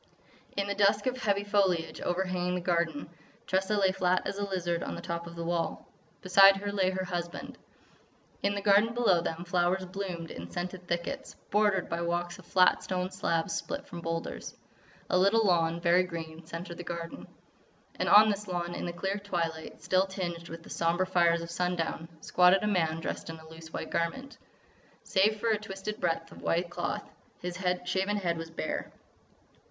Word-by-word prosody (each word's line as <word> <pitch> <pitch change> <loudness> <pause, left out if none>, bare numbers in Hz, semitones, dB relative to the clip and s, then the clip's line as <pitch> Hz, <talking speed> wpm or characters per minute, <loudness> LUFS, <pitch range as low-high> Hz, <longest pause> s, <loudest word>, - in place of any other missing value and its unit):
In 200 - +1
the 200 - -1
dusk 205 +1 +3
of 255 -1 +1
heavy 205 -5 0
foliage 195 -5 +1
overhanging 180 0 0
the - - 0
garden, 170 -4 0 0.4
Tressa 190 +3 +1
lay 195 -2 +4
flat 185 -1 +1
as 200 - -3
a - - -1
lizard 175 -3 -1
on - - -4
the - - -6
top 170 0 -4
of 170 - -9
the 170 - -4
wall. 170 0 -2 0.4
Beside 195 +1 +8
her 205 +1 -3
lay 195 -2 +2
her 185 0 -2
husband. 175 -2 -4 0.9
In 200 0 +1
the 200 - -3
garden 210 +3 +4
below 205 -8 +4
them 165 +1 -4
flowers 180 +1 +1
bloomed 180 -3 -5
in 85 +1 -7
scented 180 - -5
thickets, 170 0 -3 0.2
bordered 205 -2 +3
by 170 +1 -2
walks 175 +1 -2
of 180 - -15
flat 185 -1 +4
stone 185 0 -2
slabs 170 -3 0
split 285 0 -3
from 170 - -8
boulders. 165 0 -4 0.5
A 180 - +3
little 205 +4 +4
lawn, 170 -3 +2
very 175 +1 +4
green, 165 -2 -6
centred 170 +1 -6
the - - -4
garden. 170 -1 -6 0.7
And - - +1
on 215 +1 +8
this 205 +1 -4
lawn, 175 -1 -2
in - - -4
the 175 - -3
clear 195 +3 -2
twilight 165 -5 -3
still 185 +1 +3
tinged 175 -3 -4
with 165 0 -8
the - - -12
sombre 170 +2 +1
fires 170 -2 +3
of 170 - -7
sundown, 170 -2 -1
squatted 180 +4 +5
a - - +1
man 165 -5 +1
dressed 165 - -4
in 165 - -6
a 160 0 -14
loose 160 0 -11
white 160 - -5
garment. 265 +12 -2 0.6
Save 210 +2 +2
for 230 - 0
a 215 -2 +2
twisted 210 0 -6
breadth 165 -1 -1
of - - -12
white 170 +1 0
cloth, - - -3 0.3
his 180 0 -4 0.3
shaven 190 +3 0
head 170 -4 -1
was 165 0 -6
bare. 160 -1 -4
180 Hz, 185 wpm, -30 LUFS, 170-195 Hz, 0.9 s, Beside